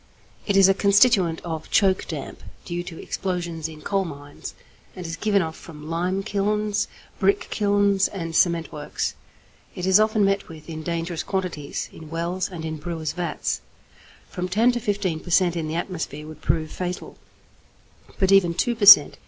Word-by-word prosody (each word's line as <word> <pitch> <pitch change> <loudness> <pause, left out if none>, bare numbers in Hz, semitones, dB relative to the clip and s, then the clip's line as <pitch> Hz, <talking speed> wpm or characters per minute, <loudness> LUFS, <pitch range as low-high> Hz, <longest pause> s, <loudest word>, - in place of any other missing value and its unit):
It 200 -2 +2
is 195 -1 +8
a 195 - +5
constituent 200 -4 +4
of 160 -2 -5
choke 190 -3 +3
damp 150 -5 -6 0.2
due 175 0 -3
to 170 -2 -8
explosions 175 -4 -3
in 155 -1 -12
coal 195 -1 0
mines, 145 -4 -9 0.4
and 180 - -7
is 165 0 -4
given 200 +2 +2
off 160 0 -5
from 155 -1 -10
lime 180 +4 -1
kilns, 210 +1 0 0.3
brick 400 0 +1
kilns, 200 -1 +2
and 165 -4 -5
cement 170 -2 +2
works. 150 0 -3 0.6
It 180 - -3
is 190 +2 +6
often 215 -1 +3
met 195 0 0
with 155 -2 -11
in 160 -1 -6
dangerous 170 +1 -3
quantities 180 -7 -3
in 160 -1 -11
wells 170 +3 -2
and 170 -4 -7
in 160 0 -4
brewers' 160 -1 -4
vats. 175 -1 -2 0.7
From 180 0 -4
10 225 +6 +4
to 240 - -2
15 200 -7 -1
per 175 - -11
cent. 175 0 +3
in 165 -2 -2
the 155 - -3
atmosphere 160 -4 -4
would 155 0 -11
prove 155 0 0
fatal, 180 0 -5 1.0
but 190 -2 +2
even 180 -4 +5
2 240 - +1
per 215 -2 0
cent. 205 - +9
175 Hz, 175 wpm, -24 LUFS, 160-195 Hz, 1.0 s, cent